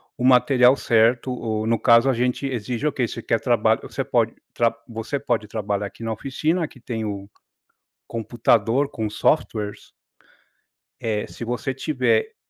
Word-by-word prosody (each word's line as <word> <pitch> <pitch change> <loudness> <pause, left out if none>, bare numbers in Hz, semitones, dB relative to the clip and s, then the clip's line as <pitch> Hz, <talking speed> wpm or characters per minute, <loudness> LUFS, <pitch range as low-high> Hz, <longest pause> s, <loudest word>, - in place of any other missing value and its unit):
o - - -5
material 125 0 +5
certo 120 0 +2
ou 110 -3 -2
no 115 0 +1
caso, 115 +1 +5
a - - +3
gente 125 +3 -1
exige 125 0 -3
Ok, 130 -5 0
você 115 - -6
quer 115 - +1
trabalho, 110 -3 +2
você 135 - -4
pode 115 -3 +1 0.2
tra 115 -1 +1
você 115 +4 -4
pode 120 -6 -1
trabalhar 105 -1 -2
aqui 115 - -12
na 115 - -2
oficina, 155 - -1
aqui 140 - -13
tem 115 -2 -4
o 100 -1 -5 0.8
computador 115 +3 +1
com 110 -2 -3
softwares 105 -2 -1 1.1
eh 105 -2 -1
se 120 - -8
você 125 +3 -2
tiver 445 - 0
120 Hz, 155 wpm, -23 LUFS, 110-130 Hz, 1.1 s, material